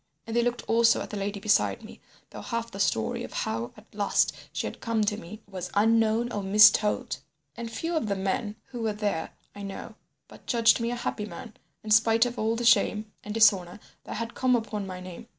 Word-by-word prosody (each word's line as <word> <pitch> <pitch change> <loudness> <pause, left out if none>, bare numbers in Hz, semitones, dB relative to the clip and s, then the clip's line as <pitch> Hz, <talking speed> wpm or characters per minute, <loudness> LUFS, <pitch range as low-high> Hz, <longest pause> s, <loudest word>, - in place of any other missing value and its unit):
And 225 - -5
they 235 - +4
looked 240 0 -1
also 230 0 +4
at - - -7
the - - -4
lady 200 +1 -3
beside 210 +1 +1
me, - - -12 0.3
though - - -8
half 230 -1 -4
the 195 - -8
story 110 - 0
of - - -8
how 115 +2 -2
at 210 - -15
last 205 -1 +2 0.2
she - - -3
had - - -6
come 230 -2 0
to 210 0 0
me 215 +2 -10
was 185 -2 -6
unknown 225 +2 +3
or 205 - -2
mistold. 210 +4 +5 0.4
And 235 0 -6
few 330 +10 -3
of 310 -9 0
the 200 - 0
men 200 +3 -2
who 245 -2 -6
were 220 -1 0
there, 205 -6 -2 0.2
I 205 - -10
know, 195 -1 -7 0.3
but - - -16
judged 230 -1 +4
me 230 0 -1
a 245 - -2
happy 215 -3 -3
man, 210 +5 -9 0.3
in 215 - -6
spite 225 +2 +5
of 245 0 -4
all 220 +1 +1
the 240 +1 -3
shame 215 -2 +3
and 210 - -7
dishonour 205 -4 +4 0.3
that - - -6
had 230 +1 -4
come 255 -1 +2
upon 215 -4 -3
my 185 -1 -7
name. 185 +5 -10
215 Hz, 220 wpm, -27 LUFS, 200-230 Hz, 0.4 s, mistold